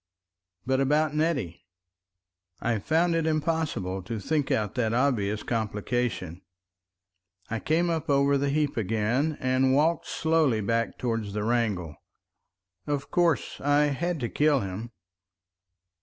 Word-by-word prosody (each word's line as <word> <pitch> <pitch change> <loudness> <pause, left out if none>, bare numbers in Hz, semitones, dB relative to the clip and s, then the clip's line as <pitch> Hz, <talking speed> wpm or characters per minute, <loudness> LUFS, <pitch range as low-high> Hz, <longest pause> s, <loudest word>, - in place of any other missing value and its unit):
But 130 +1 +1
about 150 +2 +2
Nettie? 150 - -1 1.0
I 115 -2 0
found 165 - +2
it 165 -1 +1
impossible 155 - -1
to 110 +5 -5
think 150 +6 -1
out 105 -3 0
that 115 -3 0
obvious 110 -6 +1
complication. 110 -5 -2 1.1
I 115 - -1
came 170 +6 +1
up 160 -3 -3
over 140 0 +3
the 140 0 +1
heap 150 -1 0
again, 115 +8 0
and 130 +1 +2
walked 160 +4 +2
slowly 160 -8 +2
back 115 +3 -1
towards 115 -4 -2
the 105 0 -2
wrangle. 105 -9 -1 0.9
Of 145 -1 -2
course 170 -4 +1
I 145 0 +3
had 170 +3 -2
to 120 - -1
kill 145 -3 +2
him. 100 +4 -5
130 Hz, 125 wpm, -27 LUFS, 110-155 Hz, 1.1 s, over